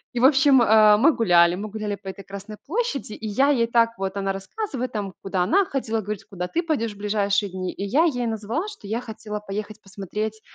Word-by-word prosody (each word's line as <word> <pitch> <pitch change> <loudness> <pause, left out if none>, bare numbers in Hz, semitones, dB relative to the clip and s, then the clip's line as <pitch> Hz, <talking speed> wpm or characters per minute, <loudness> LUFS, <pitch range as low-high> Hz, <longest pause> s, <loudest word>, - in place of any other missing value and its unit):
И - - 0
в 250 - +4
общем, 270 -2 +6
а, 215 -1 +6
мы 290 +9 +5
гуляли 175 -7 +4
мы 210 +3 -5
гуляли 210 -1 -3
по 195 0 -15
этой 190 +1 -7
Красной 200 +2 -9
площади, 335 - -2
и 220 - -6
я 265 +8 +2
ей 235 -5 +3
так 230 0 +3
вот, 195 0 -3
она 195 -1 -1
рассказывает 255 - -4
там, 200 -3 -4
куда 190 -2 -1
она 385 - +3
ходила, 225 -7 -2
говорит, 210 0 -5
куда 180 -2 -5
ты 340 - -1
пойдешь 250 -10 -1
в - - -17
ближайшие 205 -1 0
дни. 185 -1 -4
И 200 - -6
я 280 - +3
ей 245 -7 0
назвала, 225 - -2
что 400 - -10
я 225 +3 -2
хотела 215 -3 -6
поехать 210 +1 -6
посмотреть, 210 +3 -5
215 Hz, 220 wpm, -24 LUFS, 200-250 Hz, -, общем